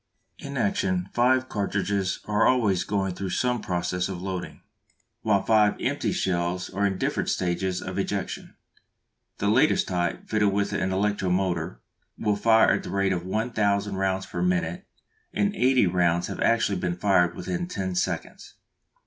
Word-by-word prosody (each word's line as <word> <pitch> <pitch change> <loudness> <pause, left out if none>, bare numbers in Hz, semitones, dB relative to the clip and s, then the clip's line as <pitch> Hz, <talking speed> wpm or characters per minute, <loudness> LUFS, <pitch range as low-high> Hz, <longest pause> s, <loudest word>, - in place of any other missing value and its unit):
In 140 -1 -6
action 95 -4 0
five 130 +2 +3
cartridges 100 -2 -1
are 105 +1 +2
always 105 -8 +2
going 95 -1 -1
through 95 +1 -4
some 125 +5 0
process 90 0 -2
of 95 -2 -5
loading, 95 -1 -5 0.6
while 100 -3 +2
five 105 -1 +4
empty - - -1
shells 90 0 -1
are 100 +2 +1
in 95 -1 -2
different - - -1
stages 90 +1 -1
of 95 +1 -4
ejection. 100 -1 -4 0.8
The 100 - -1
latest 125 +9 +3
type, 90 -2 -2
fitted 105 -2 +2
with 100 0 0
an 95 - 0
electro 100 0 0
motor, 90 -9 -1 0.4
will 105 -1 +1
fire 110 +2 +4
at - - 0
the - - -8
rate 100 -1 +1
of 90 0 -4
one 110 +5 -1
thousand 100 -2 0
rounds 95 0 0
per - - -5
minute, 180 +1 -1 0.5
and 205 0 +1
eighty 130 -2 +4
rounds 85 -1 +2
have - - -6
actually 115 -5 +2
been 85 0 -1
fired 90 -2 +3
within 175 -1 -3
ten 95 - -3
seconds! 90 - -3
100 Hz, 160 wpm, -26 LUFS, 90-110 Hz, 0.8 s, five